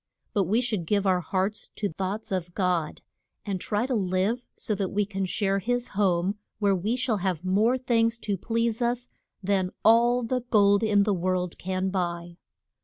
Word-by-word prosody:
But 200 -2 +2
we 215 +7 +2
should 215 -9 -2
give 205 +1 +1
our 185 -2 +3
hearts 190 +4 -2
to 210 - -1
thoughts 195 +5 -3
of 180 -2 -3
God, 180 -5 -1 0.4
and 195 -3 -3
try 210 +2 0
to 260 - -2
live 195 +3 0
so 220 - -2
that 195 -2 -1
we 205 0 0
can 195 -1 -3
share 195 +1 0
his 245 +4 -1
home, 195 0 +1 0.2
where 205 -2 +2
we 205 +6 -1
shall 250 -3 0
have 185 -3 -2
more 215 +7 +3
things 230 -2 +1
to 205 -2 0
please 230 +3 -1
us 240 +1 0 0.3
than 190 -1 +1 0.2
all 240 +2 +5
the 250 +2 -1
gold 200 -2 +5
in 210 -2 +3
the 205 0 +1
world 180 -1 -1
can 185 +1 -2
buy. 175 -2 -3
200 Hz, 180 wpm, -26 LUFS, 185-225 Hz, 0.4 s, all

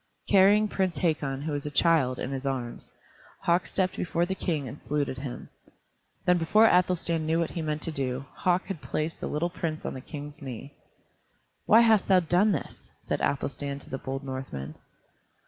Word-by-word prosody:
Carrying 205 +2 +5
Prince 190 -3 -1
Hakon, 145 -5 0
who 155 - -2
was 145 0 -3
a - - -1
child, 145 -4 +3
in 130 - -4
his 135 -1 -4
arms, 130 -3 -4 0.5
Hauk 175 +1 +2
stepped 185 -1 0
before 170 -1 0
the 190 - -2
King 160 -7 -2
and 140 - -9
saluted 145 -3 -2
him. 130 -2 -7 0.8
Then 180 0 +4
before 210 +7 +5
Athelstan 175 -4 +2
knew 160 +1 +2
what 165 -1 0
he 170 - -4
meant 150 -1 -2
to 165 - -3
do, 135 -2 -2
Hauk, 180 0 +1
had 190 -6 -5
placed 155 +2 -3
the - - -3
little 170 +4 -1
prince 165 -3 -4
on - - -3
the 130 - -7
King's 150 +1 -8
knee. 135 +1 -7 0.9
"Why 225 +2 +8
hast 220 -4 +4
thou 190 -2 +6
done 180 +5 +3
this?" 155 - -5
said - - -2
Athelstan 140 0 -1
to 140 - -11
the 135 - -3
bold 135 +1 -4
Northman. 130 - -5
155 Hz, 185 wpm, -28 LUFS, 135-180 Hz, 0.9 s, Why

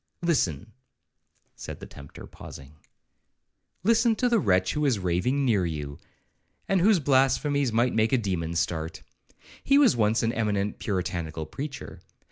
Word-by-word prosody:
—Listen,' 110 - 0 0.8
said - - -8
the - - -9
tempter, 70 0 -12
pausing, 70 +2 -12 1.1
'listen 230 +2 +3
to 250 - +1
the 235 -2 +3
wretch 95 - +2
who 150 - -1
is 125 -6 +2
raving 95 +10 0
near 105 -7 +2
you, 75 -4 -5 0.7
and 195 -2 +2
whose 200 0 +4
blasphemies 140 0 +2
might 120 +3 +1
make 110 0 +2
a 130 - +4
demon 90 -7 -2
start.—He 80 - -3
was 285 - +5
once 110 +1 +1
an 115 +1 0
eminent 105 -3 -1
puritanical 85 -5 -3
preacher. 135 - -7
110 Hz, 135 wpm, -26 LUFS, 90-140 Hz, 1.1 s, was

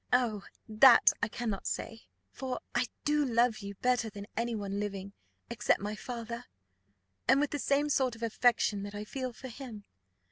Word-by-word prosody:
Oh! 240 -5 +2 0.3
that 230 +3 +7
I - - +2
cannot 220 -3 -3
say; 225 0 -4 0.2
for 260 -1 -4
I 245 +1 +1 0.2
do 295 0 +3
love 240 -3 +2
you 200 -1 -7
better 245 +1 +1
than 205 -1 -8
any 235 0 -1
one 200 -1 -3
living 200 -1 -4 0.3
except 235 - +1
my 205 +1 -3
father, 235 0 -6 0.8
and 265 +3 +6
with 295 0 +1
the 290 - -2
same 280 +2 +2
sort 265 -4 +1
of 230 - -9
affection 225 -2 +2
that 205 +1 -6
I 205 - -4
feel 255 +3 -4
for 260 +3 -9
him. 235 -4 -9
235 Hz, 175 wpm, -31 LUFS, 210-255 Hz, 0.8 s, that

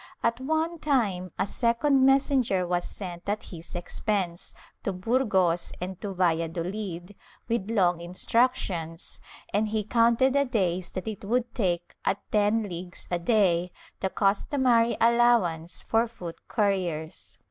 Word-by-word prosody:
At 230 +1 +1
one 315 +4 -1
time 205 - 0
a - - +1
second 255 +6 +2
messenger 265 -8 +3
was 175 0 0
sent 180 -1 -7
at 210 +1 -1
his 170 0 -10
expense, 175 0 -2 0.3
to 195 - -2
Burgos 190 -4 +1
and 185 +1 -6
to 200 -3 -4
Valladolid, 175 +2 -1 0.3
with 230 -3 -1
long 180 -6 +2
instructions, 175 -3 -1 0.3
and 210 +2 +2
he 215 0 -1
counted 235 +4 +3
the 280 0 +3
days 185 -7 0
that 185 +3 -5
it 215 -2 -5
would 240 +4 0
take 175 -6 -1
at 195 - +1
ten 210 +1 +3
leagues 175 -2 -7
a 175 - +1
day, 180 -3 +2 0.3
the 190 - -1
customary 230 +4 +2
allowance 230 -9 +3
for 225 +1 +2
foot 180 -8 -9
couriers. 185 -7 -1
200 Hz, 135 wpm, -27 LUFS, 175-235 Hz, 0.3 s, messenger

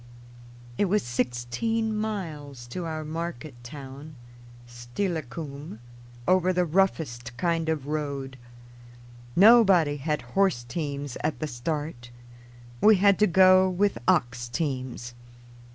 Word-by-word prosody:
] 120 0 -19
It - - +4
was 205 +2 +1
sixteen 125 - -1
miles 160 - -5
to 175 +7 -5
our 155 -1 -4
market 155 -3 -5
town, 140 +3 -10 0.5
Steilacoom, 140 - -5 0.5
over 185 0 +4
the 180 -1 +1
roughest 150 -9 0
kind 165 -1 0
of 155 -4 -1
road. 140 -3 -3 1.0
Nobody 190 -8 +6
had 150 0 -2
horse 190 -11 +2
teams 140 0 -4
at 155 +1 -1
the 155 - -3
start; 145 -1 -4 0.7
we 215 0 +7
had 200 0 +4
to 210 - +5
go 185 +1 +6
with 190 - 0
ox 120 0 +1
teams. 130 -3 -3
155 Hz, 115 wpm, -26 LUFS, 125-185 Hz, 1.0 s, we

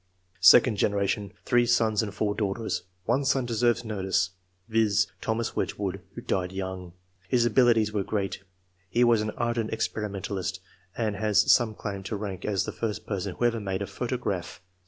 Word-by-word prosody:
Second 105 +5 +7
generation. 100 0 0
— - - -35
3 120 -1 +4
sons 110 -3 +3
and 105 -2 -3
4 105 +1 -1
daughters; 105 +1 -2 0.2
1 140 - +2
son 135 -2 +1
deserves 120 0 +1
notice, 95 -3 0 0.4
viz.: 110 -2 +3 0.2
Thomas 115 +1 -2
Wedgewood, 95 -2 -2
who - - -6
died 90 -1 -1
young. 95 -2 -5 0.4
His 120 -2 +3
abilities 115 -3 +4
were 105 - +1
great; 100 -1 -2 0.5
he 120 +7 +3
was 120 -2 +4
an 110 - -2
ardent 120 -1 -1
experimentalist, 100 -4 -3 0.4
and 110 -4 -1
has 105 0 +3
some 110 -3 +3
claim 100 -2 -5
to 105 - -3
rank 100 -3 -5
as 100 -3 +1
the - - -4
first 110 -1 -4
person 100 -3 -3
who 120 - 0
ever 115 -1 +2
made 95 -1 -2
a - - -2
photograph. 100 -3 -3
105 Hz, 170 wpm, -27 LUFS, 95-115 Hz, 0.5 s, Second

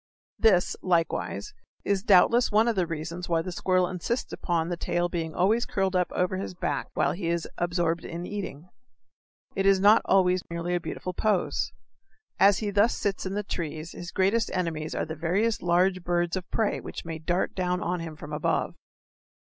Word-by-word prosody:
This, 190 -6 +4
likewise, 175 - -1 0.3
is 200 -1 +1
doubtless 230 +4 +5
one 215 +2 +4
of 235 - +1
the 180 -3 +1
reasons 165 +2 -5
why 165 -1 +2
the 185 - -5
squirrel 185 0 +1
insists 185 +8 -3
upon 170 -2 -1
the 175 - -1
tail's 175 +1 -1
being 165 -2 -3
always 220 +6 +2
curled 195 -1 0
up 180 -1 +1
over 180 +1 0
his 190 -1 -5
back - - -2
while - - +2
he 175 -1 -4
is 170 0 -1
absorbed 170 -1 0
in 170 +1 -6
eating. 180 -5 -6 0.9
It 195 0 +1
is 195 -1 +5
not 205 +3 +6
always 185 -1 +3
merely 170 +1 -3
a 175 - +1
beautiful 180 +1 -5
pose. 205 -1 0 0.7
As 200 -1 +6
he 210 -2 -2
thus 205 +3 +3
sits 195 -2 -2
in 190 - -4
the 210 - -1
trees 160 -3 -5
his 175 - -8
greatest 205 +6 +1
enemies 160 -4 -2
are - - -1
the 160 - -5
various 185 +8 0
large 180 +1 +2
birds 175 0 0
of 185 -1 -5
prey 220 -2 0
which - - -8
may 165 -1 -5
dart 175 +4 -1
down 180 -1 -1
on 180 0 -2
him 165 -2 -6
from 150 0 -9
above. 150 - 0
180 Hz, 190 wpm, -27 LUFS, 170-195 Hz, 0.9 s, not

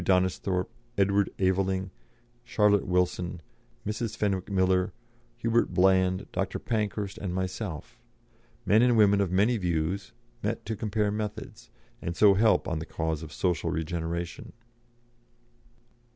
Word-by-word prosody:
Donnisthorpe, 90 0 +1 0.3
Edward 100 0 +3
Aveling, 95 0 0 0.5
Charlotte 105 -4 +2
Wilson, 90 -1 0 0.5
Mrs. 110 +1 -3
Fenwick 100 -3 -1
Miller, 95 -1 +2 0.4
Hubert 120 0 +1
Bland, 95 0 +3
Dr. - - -2
Pankhurst, 105 -3 -2
and 90 -3 -3
myself 95 -2 -4 0.7
men 105 +3 +5
and 120 -1 +4
women 100 -2 +5
of 100 - 0
many 105 +6 +3
views, 90 +1 -1 0.3
met 105 +3 -3
to 110 - -3
compare 105 0 0
methods, 105 +1 -5 0.3
and 85 0 -4
so 105 -2 +7
help 110 +3 +3
on 85 -2 -1
the 80 - -5
cause 80 -1 -2
of 80 -2 -8
social 85 0 0
regeneration. 85 +1 -4
95 Hz, 125 wpm, -28 LUFS, 90-105 Hz, 0.7 s, so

